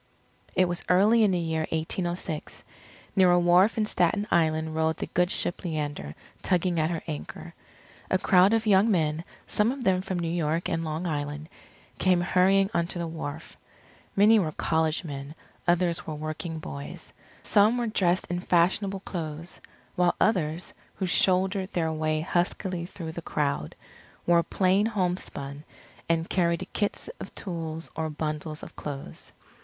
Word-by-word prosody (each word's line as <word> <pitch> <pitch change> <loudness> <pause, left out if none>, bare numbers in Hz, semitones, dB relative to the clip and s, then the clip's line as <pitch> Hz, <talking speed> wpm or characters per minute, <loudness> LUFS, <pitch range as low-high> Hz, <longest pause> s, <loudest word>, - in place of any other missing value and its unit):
It 185 - +4
was 175 0 -3
early 210 +5 +5
in 210 - +5
the 185 - +1
year 160 -2 -1
1806. 165 0 -3 0.5
Near 190 -2 +6
a 175 0 +5
wharf 175 +5 +4
in 215 - +2
Staten 205 +1 +1
Island 160 -1 +2
rode 160 0 +1
the - - -3
good 180 0 +1
ship 175 - -1
Leander 145 - -3 0.3
tugging 180 -2 +1
at 155 +1 +2
her 165 -2 -3
anchor. 75 +1 -7 0.6
A 185 - +3
crowd 185 +1 +5
of 225 0 +1
young 205 +1 +5
men, 160 -4 +1 0.2
some 215 +3 +1
of 265 -1 -5
them 185 -4 +3
from 190 -1 -3
New 170 -1 -1
York 165 0 0
and 165 0 -1
Long 160 +2 -3
Island, 145 -1 -3 0.5
came 185 -2 +3
hurrying 190 +2 +3
onto 170 -1 -1
the 170 - -2
wharf. 160 -1 -6 0.6
Many 215 +3 +6
were 160 -6 0
college 160 0 0
men, 140 -1 -7 0.3
others 175 -1 +1
were 155 - -3
working 155 +2 -5
boys. 155 +3 -7 0.3
Some 215 +3 +4
were 240 - 0
dressed 185 -5 +1
in 175 - -1
fashionable 190 +3 +1
clothes; 165 -3 -5 0.3
while 175 -1 +3
others, 170 -5 +1 0.2
who 190 - -2
shouldered 185 +1 +2
their 160 -2 0
way 155 0 0
huskily 175 +1 -1
through 165 -3 -7
the 170 - -6
crowd, 140 - -2 0.5
wore 170 -1 +5
plain 190 +4 +2
homespun 175 -8 -3 0.5
and 165 0 +1
carried 170 0 0
kits 205 -1 -1
of - - -9
tools 165 -4 -5
or 160 0 -2
bundles 155 0 -4
of - - -10
clothes. 140 -2 -7
175 Hz, 155 wpm, -27 LUFS, 160-185 Hz, 0.6 s, Near